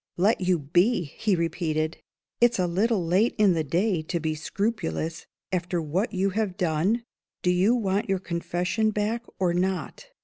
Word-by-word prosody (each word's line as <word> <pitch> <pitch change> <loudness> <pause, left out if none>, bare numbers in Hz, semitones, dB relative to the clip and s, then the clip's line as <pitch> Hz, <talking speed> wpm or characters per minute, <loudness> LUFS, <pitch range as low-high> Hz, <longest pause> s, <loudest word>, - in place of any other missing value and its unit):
"Let 200 +4 +3
you 180 -1 +2
be!" 175 - +2
he 190 +7 -1
repeated. 160 -2 -1 0.4
"It's 240 0 +4
a 185 - +2
little 190 +2 +1
late 190 +8 +2
in 205 -4 +5
the 160 -2 0
day 175 +4 +1
to 170 +2 -3
be 160 0 -1
scrupulous, 165 -2 -3 0.2
after 180 -1 -1
what 170 - -1
you 195 +1 0
have 200 -2 -1
done. 180 +8 +1 0.4
Do 180 - +3
you 190 +7 +3
want 200 -3 0
your 195 - +2
Confession 180 +4 -1
back, 215 +3 -1
or 180 -2 +1
not?" 185 - -2
185 Hz, 165 wpm, -26 LUFS, 170-210 Hz, 0.4 s, in